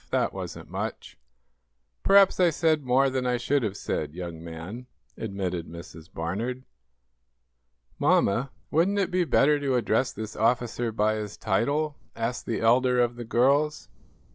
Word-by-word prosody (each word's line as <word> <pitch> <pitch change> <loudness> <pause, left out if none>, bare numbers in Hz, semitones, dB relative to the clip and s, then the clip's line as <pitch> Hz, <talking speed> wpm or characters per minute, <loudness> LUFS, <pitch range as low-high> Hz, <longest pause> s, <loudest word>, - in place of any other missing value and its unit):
"That - - 0
wasn't - - -7
much." - - -5 0.9
"Perhaps 195 -1 +5
I 180 -2 +5
said 155 -2 +1
more 130 +2 +3
than 130 -1 -1
I 125 0 +1
should 135 +4 +1
have 105 -3 -3
said, 75 - -3
young 85 -2 -6
man," 85 +9 -8 0.3
admitted 95 -5 -4
Mrs. 85 -1 -11
Barnard. 110 +10 -3 1.4
"Mamma, 120 +7 +2 0.2
wouldn't 180 +6 +2
it 195 -3 0
be 180 -1 +2
better 150 -1 +3
to 140 -2 0
address 120 +2 +1
this 110 +1 -7
officer 120 0 0
by 110 0 +1
his 105 -1 -6
title?" 140 +9 0 0.2
asked 115 +2 -3
the 115 - -2
elder 125 +2 +3
of 120 0 +2
the 120 0 -7
girls. 140 +6 +2
120 Hz, 145 wpm, -26 LUFS, 105-140 Hz, 1.4 s, Perhaps